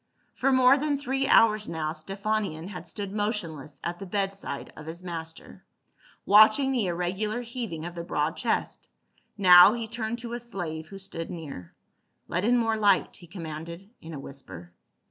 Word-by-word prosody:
For 275 - +1
more 260 +1 +6
than 295 0 0
three 270 0 -1
hours 215 -5 +4
now 155 -2 -2
Stephanion 195 0 -3
had 190 - -8
stood 200 -2 -5
motionless 170 - -3
at 175 0 -4
the 195 - -7
bedside 195 -6 -3
of 155 - -11
his 170 +3 -8
master, 165 -2 -7 0.6
watching 215 +6 +6
the 240 -7 0
irregular 190 +6 -2
heaving 230 -10 -5
of 175 - -6
the 170 -1 -6
broad 155 -1 -1
chest; 235 - -2 0.5
now 180 0 +9
he 230 -1 -4
turned 230 0 -3
to 235 0 -7
a 240 - -3
slave 175 -9 -5
who 195 - -10
stood 190 -4 -7
near, 140 - -8 0.3
" - - -48
Let 175 - -1
in 245 +3 +4
more 225 -2 +1
light," 205 -3 +2
he 175 - -14
commanded 170 +3 -8
in 165 - -9
a - - -6
whisper. 90 -12 -9
195 Hz, 170 wpm, -27 LUFS, 165-225 Hz, 0.6 s, now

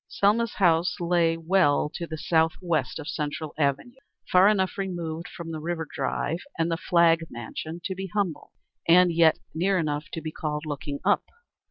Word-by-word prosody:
Selma's 215 +3 +1
house 175 -1 +2
lay 170 -1 +2
well 165 -3 +2
to 170 +3 -6
the 160 - -5
south 160 0 +2
west 170 -6 -1
of 160 -2 -7
Central 150 0 -4
Avenue, 155 - -1 0.3
far 185 +2 +7
enough 190 -3 +2
removed 175 -4 -4
from 170 -1 -8
the 160 - -4
River 165 0 -3
Drive 165 +3 -2 0.2
and 165 +1 0
the - - +2
Flagg 170 -1 +4
mansion 155 +8 -6
to 190 - -2
be 190 +1 -5
humble 190 -3 -2 0.4
and 175 +1 +6
yet 165 -1 +5 0.2
near 185 +4 +1
enough 150 -3 -1
to - - -3
be 155 -1 -5
called 150 -1 -3
looking 145 -1 -4
up. - - +3
165 Hz, 175 wpm, -26 LUFS, 155-180 Hz, 0.4 s, far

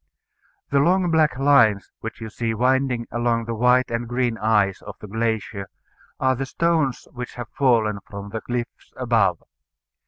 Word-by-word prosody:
The 140 - +4
long 175 +3 +3
black 155 -4 +3
lines 120 -8 +4
which 115 +1 -7
you 110 -1 -6
see 115 0 -2
winding 130 0 +1
along 120 0 0
the 115 - -3
white 125 +2 +3
and 115 +1 -2
green 120 -1 0
ice 105 -3 +2
of 105 - -9
the - - -9
glacier 110 -2 -2 0.5
are 130 0 +2
the 135 +2 -4
stones 160 -4 0
which 125 0 -7
have 120 -3 -7
fallen 115 -6 +2
from 100 0 -7
the 110 0 -4
cliffs 120 -1 -5
above. 115 -9 +1
120 Hz, 160 wpm, -23 LUFS, 110-130 Hz, 0.5 s, The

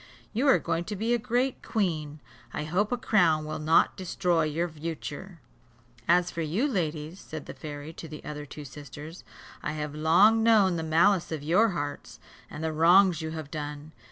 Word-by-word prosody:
You 255 +6 +1
are 270 - +7
going 165 +1 -2
to 210 - -4
be 225 +4 0
a 240 - +2
great 245 +4 0
Queen: 155 -8 -2 0.3
I - - -2
hope 185 +8 0
a 245 - +1
crown 175 -10 +2
will 155 0 -4
not 155 +2 +3
destroy 175 -3 0
your 160 +3 -1
virtue." 165 +2 -6 0.7
"As 175 +1 +3
for 170 - -4
you, 175 - 0
ladies," 165 - -3
said 155 -2 -8
the - - -8
fairy 150 +1 -8
to 165 - -9
the 155 -1 -10
other 150 -1 -6
two 150 +1 -9
sisters, 150 +4 -10 0.4
"I 150 - -3
have 150 -1 -4
long 175 +9 +5
known 210 -6 +4
the - - -2
malice 165 +4 +3
of 155 -3 -4
your 185 +9 +4
hearts, 145 -1 -5 0.3
and 150 - -7
the 160 0 -1
wrongs 175 +2 +5
you 160 - -4
have 155 -3 -7
done. 150 0 -6
160 Hz, 185 wpm, -28 LUFS, 150-190 Hz, 0.7 s, are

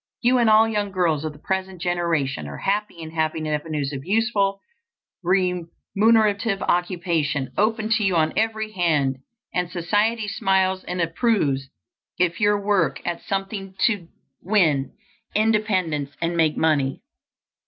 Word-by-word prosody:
You 250 +1 +4
and 235 -2 +4
all 220 +1 +6
young 210 -2 -1
girls 170 -6 0
of 155 - -3
the 150 - -15
present 190 +3 -3
generation 165 - -1
are 70 - -7
happy 205 -1 -1
in 160 -1 -7
having 160 -1 -1
avenues 150 -2 -2
of 135 -1 -5
useful 200 0 +1 0.6
remunerative 195 +4 +1
occupation 170 -6 0
open 215 +1 +1
to 225 -1 +2
you 190 -3 +2
on 160 -1 +2
every 220 0 -1
hand, 155 -9 +1 0.4
and 180 -1 -1
society 210 +5 0
smiles 190 -1 +1
and 180 0 -3
approves 165 - 0 0.5
if 175 -1 +1
you 205 0 +4
work 205 0 +1
at 175 -1 -3
something 195 -1 -4
to 205 -7 0 0.3
win 160 -9 +2 0.4
independence 190 -10 +1
and 170 +1 -1
make 160 -2 +2
money. 145 -4 +1
180 Hz, 135 wpm, -23 LUFS, 160-210 Hz, 0.6 s, all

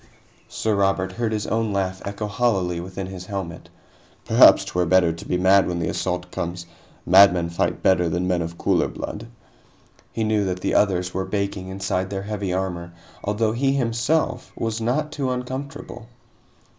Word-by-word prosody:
Sir 110 - -1
Robert 95 -1 +1
heard 115 +3 -2
his 105 -1 -2
own 110 -1 0
laugh 95 -1 -2
echo 100 +2 -4
hollowly 100 -6 0
within 95 +2 -6
his 95 -1 -8
helmet. 95 -5 -6 0.6
"Perhaps - - +7
'twere 90 -1 -1
better 90 -2 +4
to 85 - -10
be 90 - 0
mad 95 +2 +4
when 90 - -2
the 80 -1 -1
assault 90 +1 -3
comes. 85 0 -4 0.4
Madmen 90 -3 +6
fight 85 - -1
better 90 -2 +3
than 90 +3 -1
men 90 -2 +1
of 85 +1 -5
cooler - - +2
blood." - - -6 0.8
He 115 - -2
knew 110 -1 +1
that 90 -1 -3
the - - -1
others 90 -3 +2
were 95 0 -2
baking 100 -1 -3
inside 95 -1 -2
their 95 -1 -4
heavy 100 -2 -3
armor, 90 -2 -3 0.3
although 105 +2 0
he 135 +4 +1
himself 125 +2 0
was 115 0 -3
not 150 +7 0
too 140 -4 -2
uncomfortable. 125 -1 -5
95 Hz, 170 wpm, -23 LUFS, 90-110 Hz, 0.8 s, Perhaps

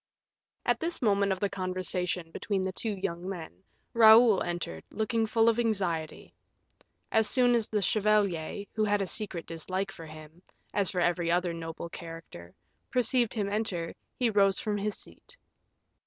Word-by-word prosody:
At 240 -1 +2
this 335 +1 -2
moment 200 -3 +2
of 190 - -1
the 200 - +1
conversation 185 -2 -2
between 195 +2 -2
the 190 - -1
two 225 - -3
young 180 -1 -4
men, 160 - -8 0.3
Raoul 225 -2 +7
entered, 175 - -4
looking 220 +1 0
full 225 +1 +3
of 230 0 +3
anxiety. 185 -9 -2 0.8
As 220 -1 +3
soon 245 -2 +4
as 230 -3 +2
the 210 -2 0
chevalier, 205 -3 +1
who 215 - 0
had 205 -1 +2
a - - -2
secret 190 -3 -3
dislike 185 +4 -4
for 165 -4 -10
him, 155 +2 -12 0.3
as 200 -2 +3
for 180 -3 -1
every 175 -1 +1
other 175 0 +1
noble 165 0 -6
character, 165 - -10 0.3
perceived 245 -1 +1
him 205 -3 0
enter, 200 -5 -2 0.2
he 240 -3 +2
rose 195 -2 +3
from 210 -1 -1
his 210 +1 -2
seat. - - -12
195 Hz, 160 wpm, -29 LUFS, 170-220 Hz, 0.8 s, Raoul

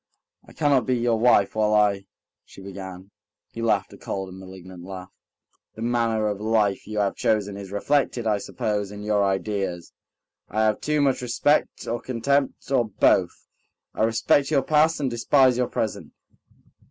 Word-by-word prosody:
"I - - -15
cannot 140 -6 +2
be 130 -1 +2
your 115 -1 +1
wife 110 -4 +4
while 105 -1 +2
I...." 100 -2 +2 0.4
she - - -16
began. 95 0 -9 0.4
He 115 - -7
laughed 110 -3 0
a - - -14
cold 95 -1 -5
and 95 +1 -11
malignant 95 -1 -11
laugh. 95 0 -9 0.6
"The 110 - -6
manner 115 -2 0
of 105 -1 -2
life 105 -3 +1
you 105 0 -5
have 100 -1 0
chosen 105 -2 0
is 100 -1 -9
reflected, 125 +2 0
I 105 -2 +1
suppose, 105 -2 -3
in 105 0 -8
your 105 -1 +1
ideas. 95 -3 -2 0.6
I 110 +2 0
have 110 -1 +1
too 150 -1 0
much 135 -3 +1
respect 125 +5 0
or 120 +1 -3
contempt, 135 +3 -1
or 125 -3 +3
both... 95 -3 +2 0.5
I - - -4
respect 115 +5 +2
your 140 -4 +2
past 155 +3 +3
and 140 - 0
despise 130 +2 +3
your 125 0 0
present 110 - -4
110 Hz, 165 wpm, -24 LUFS, 100-125 Hz, 0.6 s, wife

